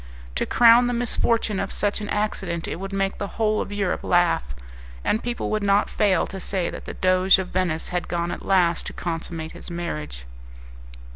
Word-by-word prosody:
To - - -1
crown 240 +1 +6
the 245 - 0
misfortune 230 -3 0
of - - -3
such 205 +1 -1
an 205 - -5
accident 195 -5 -2
it - - -4
would 195 +2 -6
make 195 0 -1
the 200 - -2
whole 215 -1 +2
of - - -5
Europe 200 -3 -1
laugh, 170 - +2 0.5
and 220 - +1
people 240 0 -3
would 215 0 0
not 200 0 +2
fail 205 -3 +2
to 195 - -7
say 185 -2 -1
that - - -8
the - - -7
Doge 185 +1 +4
of 185 -1 -4
Venice 175 -3 -1
had 180 0 -2
gone 170 0 -2
at - - -6
last 175 -3 +2
to - - -6
consummate 165 -1 -4
his - - -7
marriage. 75 - -5
190 Hz, 195 wpm, -24 LUFS, 170-210 Hz, 0.5 s, crown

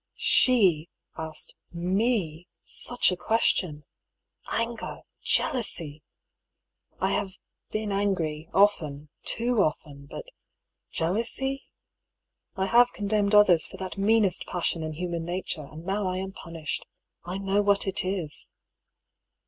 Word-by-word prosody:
She 185 -11 +4 0.3
asked 160 -1 -2 0.2
me 180 -2 0 0.2
such 245 -5 +1
a - - 0
question! 180 -6 +1 0.7
Anger, 230 0 -3 0.2
jealousy! 165 - +1 1.0
I 190 +2 +1
have 195 -1 -1 0.4
been 215 -1 -2
angry 170 -6 -1
often, 155 -8 +2 0.2
too 235 -1 +1
often 145 -4 -2
— - - -24
^but - - -6 0.7
jealousy? 235 +10 -2 0.9
I 190 - 0
have 240 +4 +5
condemned 205 0 +1
others 185 -6 +6
for 190 - -11
that 190 +1 -6
meanest 205 -2 +3
passion 170 -1 -1
in 155 0 -4
human 170 0 -3
nature, 175 -3 -4
and 160 +2 -10
now 195 +1 -1
I 185 0 -1
am 190 +1 -4
punished. 165 -4 -5 0.4
I 180 +2 -4
know 195 +1 +1
what 200 -1 +2
it 195 +1 +2
is 185 -5 -3
190 Hz, 120 wpm, -27 LUFS, 165-210 Hz, 1.0 s, others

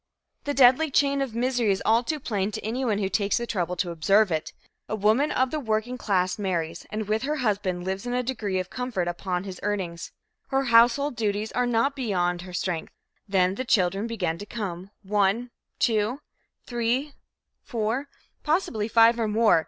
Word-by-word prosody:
The 285 0 -1
deadly 265 +4 +6
chain 280 0 +2
of 255 -5 -3
misery 245 -2 +1
is 195 - -1
all 225 +2 +4
too 305 +4 -2
plain 205 -7 -1
to - - -5
anyone 230 -1 0
who 200 -2 0
takes 200 0 +1
the 235 - -2
trouble 180 -6 -2
to 175 0 -1
observe 195 +5 +3
it. 160 0 -2 0.4
A 215 - -1
woman 220 +8 +3
of 260 0 +1
the 310 - -1
working 225 -1 -1
class 185 -5 0
marries 170 -4 -2
and 215 -1 -4
with 215 +1 0
her 295 +4 -1
husband 195 -4 0
lives 190 +4 -3
in 245 - -2
a 250 - 0
degree 220 -6 -2
of 185 -1 -3
comfort 245 -8 -2
upon 180 +1 -2
his 190 -2 -7
earnings. 185 -5 -3 0.4
Her 270 0 +1
household 245 +3 +4
duties 215 -1 -1
are 250 0 0
not 245 +4 +1
beyond 180 -9 0
her 180 0 -10
strength. 180 -2 -3 0.4
Then 185 -1 +3
the 255 - -3
children 195 -2 +1
begin 180 -8 -2
to 205 - -6
come 190 -5 -5
one, 205 +4 +1 0.3
two, 225 +3 +1 0.5
three, 245 +4 -1 0.5
four, 235 +5 -2 0.3
possibly 300 - 0
five 230 +1 +5
or 225 - +1
more. 215 -3 +4
215 Hz, 185 wpm, -26 LUFS, 190-245 Hz, 0.5 s, deadly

